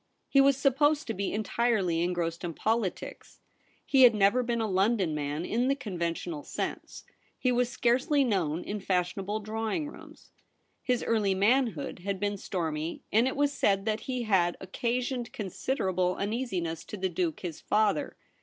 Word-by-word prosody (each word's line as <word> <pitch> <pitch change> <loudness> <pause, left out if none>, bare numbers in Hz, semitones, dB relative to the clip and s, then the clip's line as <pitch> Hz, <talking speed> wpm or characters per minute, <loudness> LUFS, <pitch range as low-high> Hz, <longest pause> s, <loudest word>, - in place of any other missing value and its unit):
He 275 - +5
was 275 -1 +4
supposed 290 +3 +2
to 225 - -3
be 200 0 -2
entirely 210 -5 +1
engrossed 170 -1 -1
In 170 -2 -4
politics. 220 -4 -2 0.5
He 270 - +4
had 240 -3 +8
never 205 +5 +4
been 235 -1 -1
a 225 - 0
London 190 -3 +1
man 150 +2 -3
in 240 +3 0
the 275 - +2
conventional 170 - -3
sense. - - -5 0.3
He 255 - +1
was 245 0 +2
scarcely 250 +4 +2
known 180 - 0
in 210 +1 -4
fashionable 190 +3 -1
drawing 220 - -2
rooms. 295 - -13 0.5
His 250 -2 0
early 210 -4 +1
manhood 215 - +1
had 195 +1 -3
been 205 0 -1
stormy, 165 -4 -3
and 230 +4 +4
it 260 - -2
was 285 0 +1
said 195 -6 +1
that 215 0 0
he 255 -2 -1
had 185 -5 +2
occasioned 240 +5 -2
con 205 -3 -4
siderable 185 -8 0
uneasiness 195 -7 -2
to 210 - -7
the 190 0 0
Duke 170 -2 -2
his 170 -4 -6
father. 215 +7 +1
210 Hz, 165 wpm, -29 LUFS, 180-245 Hz, 0.5 s, had